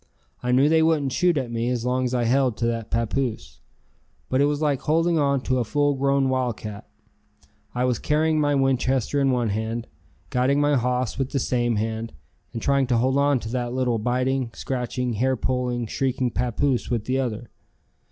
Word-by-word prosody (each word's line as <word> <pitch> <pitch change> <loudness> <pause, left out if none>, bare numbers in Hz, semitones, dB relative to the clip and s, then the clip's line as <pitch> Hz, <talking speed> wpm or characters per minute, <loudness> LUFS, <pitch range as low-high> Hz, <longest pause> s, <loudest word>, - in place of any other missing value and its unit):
I 125 - -1
knew 130 +3 +4
they 160 +1 +4
wouldn't 155 -4 +2
shoot 175 +4 +2
at 130 -4 -2
me 115 +1 -1
as 125 -1 -2
long 130 +1 0
as 125 - -2
I 120 - +1
held 125 -1 +2
to 115 - -1
that 115 -1 -2
papoose. 115 - -2 0.7
But 130 +1 +2
it - - +5
was 145 0 0
like 145 -4 0
holding 165 +2 +2
on 140 -2 +2
to 130 0 0
a - - +1
full 145 +5 +1
grown 140 0 +1
wildcat. 115 -5 -3 0.9
I 125 +1 +1
was 125 -2 0
carrying 155 +1 +1
my 145 -1 +2
Winchester 135 0 +1
in 135 - +3
one 120 -3 +1
hand, 110 +3 -3 0.5
guiding 130 +3 +2
my 145 0 +3
hoss 125 -1 -1
with 135 -1 -1
the - - +1
same 120 -2 0
hand 110 +1 -3 0.4
and 115 - -6
trying 140 -1 +2
to 120 -2 +2
hold 130 +3 +2
on 140 -2 +3
to 110 - -6
that 120 0 -2
little 125 -3 0
biting, 125 +2 0
scratching, 125 -1 -3
hair 130 +5 +1
pulling, 125 -1 -1
shrieking 130 +1 -1
papoose 125 +2 0
with 115 -3 -1
the 130 +1 0
other. 120 -3 -4
125 Hz, 190 wpm, -24 LUFS, 120-140 Hz, 0.9 s, it